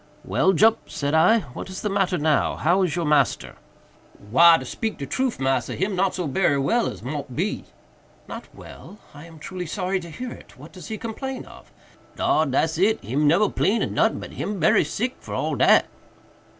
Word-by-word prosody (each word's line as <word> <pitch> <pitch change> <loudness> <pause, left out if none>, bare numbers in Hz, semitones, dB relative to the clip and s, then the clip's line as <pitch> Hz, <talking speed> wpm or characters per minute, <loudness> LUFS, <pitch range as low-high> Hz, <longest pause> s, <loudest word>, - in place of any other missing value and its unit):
"Well, 190 - +2
Jup," 220 +6 +3
said 145 0 -3
I, 180 +8 +4
"what - - -7
is 185 - -7
the - - 0
matter 195 -2 +1
now?—how 155 +4 +1
is 180 -3 0
your 170 -2 -1
master?" 150 -3 +1 0.8
"Why, 170 +5 +7
to - - -7
speak 225 -2 -4
de 140 - -5
troof, 255 - -2
massa, 135 0 -1
him 190 +1 -1
not 190 +1 +1
so 180 - -3
berry 145 0 +1
well 230 +13 +1
as - - -7
mought 140 0 -5
be." 190 +7 -2 0.6
"Not - - -8
well! 205 - -12 0.2
I 150 +3 -12
am 165 -1 -14
truly 180 +3 -7
sorry 185 +2 -2
to 170 -1 -10
hear 250 +10 -7
it. - - -13
What 145 +5 -13
does 185 - -10
he 220 - -5
complain 255 +4 -6
of?" - - -16 0.4
"Dar! 155 0 +1
dat's 155 +4 0
it!—him 150 - +1
neber 180 +8 +4
'plain 215 +4 +1
of - - -3
notin'—but - - 0
him 205 -1 -4
berry 165 - +4
sick 225 - -3
for - - -7
all - - -1
dat." - - +4
180 Hz, 190 wpm, -23 LUFS, 150-205 Hz, 0.8 s, Why